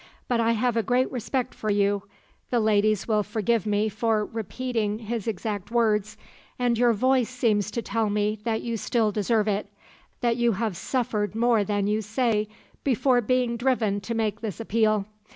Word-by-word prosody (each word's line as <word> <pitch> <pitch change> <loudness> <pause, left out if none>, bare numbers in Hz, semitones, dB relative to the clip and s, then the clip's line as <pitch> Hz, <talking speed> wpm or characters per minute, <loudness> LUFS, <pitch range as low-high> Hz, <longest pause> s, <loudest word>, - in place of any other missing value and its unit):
But 240 -2 +1
I 230 0 +3
have 235 +1 0
a 230 - +3
great 250 +4 +1
respect 250 +1 -2
for 215 - -4
you' 200 -1 +2 0.5
the 245 - +2
ladies 215 -1 +2
will 215 -2 +2
forgive 220 +1 0
me 210 +1 +1
for 215 0 0
repeating 225 -1 -3
his 225 -1 -4
exact 210 -1 -3
words 215 -3 +1 0.4
'and 245 -1 +1
your 240 +1 +4
voice 255 +2 +2
seems 220 -5 +1
to 230 +2 -3
tell 225 -2 0
me 210 +1 0
that 220 -1 -1
you 230 -1 -2
still 220 0 +1
deserve 210 +1 +1
it; 205 0 -1 0.5
that 235 -2 +1
you 240 -1 +2
have 215 -1 -2
suffered 215 0 -1
more 230 -2 +3
than 205 -1 -1
you 210 +1 +1
say 215 0 0 0.4
before 255 -1 +3
being 245 0 +1
driven 230 -5 +1
to 230 +4 -4
make 220 -2 -1
this 210 -7 -5
appeal. 215 -2 +1
220 Hz, 175 wpm, -26 LUFS, 210-235 Hz, 0.5 s, your